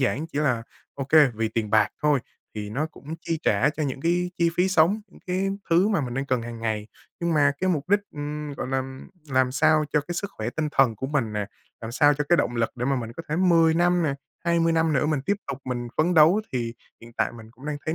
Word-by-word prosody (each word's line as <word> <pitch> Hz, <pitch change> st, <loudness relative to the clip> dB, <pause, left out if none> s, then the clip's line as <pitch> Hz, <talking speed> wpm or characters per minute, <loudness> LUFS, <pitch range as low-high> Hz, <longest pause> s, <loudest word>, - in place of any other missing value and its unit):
giản 135 Hz, +4 st, 0 dB
chỉ 145 Hz, -, -5 dB
là 125 Hz, -6 st, +1 dB, 0.3 s
OK, 135 Hz, -1 st, -5 dB, 0.3 s
vì 110 Hz, 0 st, -1 dB
tiền 110 Hz, -2 st, -2 dB
bạc 110 Hz, -, +4 dB
thôi, 145 Hz, -3 st, +3 dB, 0.3 s
thì 105 Hz, -1 st, -5 dB
nó 145 Hz, +7 st, -1 dB
cũng 155 Hz, 0 st, -9 dB
chi 165 Hz, -2 st, -2 dB
trả 120 Hz, +8 st, +3 dB
cho 155 Hz, -, -4 dB
những 135 Hz, -2 st, -3 dB
cái 175 Hz, +3 st, +1 dB
chi 170 Hz, -1 st, +3 dB
phí 180 Hz, +2 st, +3 dB
sống, 185 Hz, +4 st, +3 dB
những -, -, -19 dB
cái 185 Hz, +2 st, 0 dB, 0.2 s
thứ 175 Hz, +5 st, +4 dB
mà 205 Hz, -6 st, +1 dB
mình 125 Hz, -3 st, -4 dB
đang 135 Hz, +1 st, -2 dB
cần 125 Hz, -3 st, 0 dB
hàng 115 Hz, -1 st, -7 dB
ngày. 110 Hz, -2 st, -2 dB, 0.3 s
Nhưng 170 Hz, -1 st, 0 dB
mà 145 Hz, -1 st, +4 dB
cái 185 Hz, 0 st, +2 dB
mục 150 Hz, -3 st, -2 dB
đích, 205 Hz, +2 st, +4 dB
ừm, 150 Hz, 0 st, -5 dB
gọi -, -, -5 dB
là, 135 Hz, 0 st, 0 dB
ừm, 130 Hz, 0 st, -7 dB, 0.2 s
làm 130 Hz, -1 st, +2 dB
sao 155 Hz, +1 st, +3 dB
cho 150 Hz, -, +3 dB
cái 175 Hz, +4 st, -6 dB
sức 200 Hz, +3 st, -3 dB
khỏe 110 Hz, +2 st, -4 dB
tinh 155 Hz, +3 st, -2 dB
thần 125 Hz, -5 st, +3 dB
của 130 Hz, -, -4 dB
mình 135 Hz, -7 st, -1 dB
nè, 105 Hz, -1 st, -2 dB, 0.3 s
làm 115 Hz, 0 st, -6 dB
sao 145 Hz, +2 st, +4 dB
cho 145 Hz, +1 st, -2 dB
cái 175 Hz, -, +5 dB
động 120 Hz, -, 0 dB
lực 115 Hz, -1 st, +1 dB
để 125 Hz, -, -2 dB
mà 135 Hz, 0 st, +1 dB
mình 115 Hz, -2 st, -5 dB
có 165 Hz, -, -8 dB
thể 155 Hz, -, -1 dB
10 165 Hz, -3 st, +4 dB
năm 175 Hz, +1 st, +3 dB
nè, 140 Hz, -3 st, 0 dB, 0.3 s
20 170 Hz, -1 st, +2 dB
năm 160 Hz, -1 st, +2 dB
nữa 145 Hz, +1 st, +2 dB
mình 150 Hz, -3 st, 0 dB
tiếp 200 Hz, -, +2 dB
tục 140 Hz, -1 st, -4 dB
mình 120 Hz, -1 st, -3 dB
phấn 175 Hz, +3 st, +2 dB
đấu, 165 Hz, +7 st, +6 dB
thì 120 Hz, -2 st, -2 dB, 0.3 s
hiện 115 Hz, 0 st, -13 dB
tại -, -, 0 dB
mình 110 Hz, -2 st, -12 dB
cũng 130 Hz, +5 st, -13 dB
đang 150 Hz, -1 st, -2 dB
thấy 160 Hz, -, -1 dB
145 Hz, 260 wpm, -25 LUFS, 125-165 Hz, 0.3 s, đấu